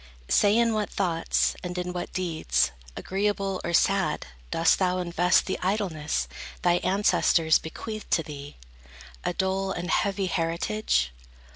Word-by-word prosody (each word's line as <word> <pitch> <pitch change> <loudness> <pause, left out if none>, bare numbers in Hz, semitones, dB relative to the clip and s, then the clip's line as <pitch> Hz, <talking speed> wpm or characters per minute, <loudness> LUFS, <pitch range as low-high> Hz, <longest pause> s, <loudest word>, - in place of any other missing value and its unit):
Say 205 +1 +4
in 235 -1 +3
what 210 -2 -1
thoughts, 170 -4 0
and 180 0 -4
in 180 0 -3
what 175 -1 -4
deeds, 170 - 0 0.3
Agreeable 195 -1 -1
or 170 - -2
sad, 195 +3 +2 0.2
dost 165 0 +3
thou 185 -1 +2
invest 180 0 +2
The 190 - -2
idleness 180 -6 -1 0.4
thy 175 -1 +4
ancestors 175 -4 +3
bequeathed 215 +6 -7
To 165 - +2
thee, 145 -1 -9 0.7
a - - -1
dull 190 +1 0
and 175 0 -3
heavy 200 -1 +1
heritage? 165 - 0
180 Hz, 135 wpm, -26 LUFS, 170-195 Hz, 0.7 s, Say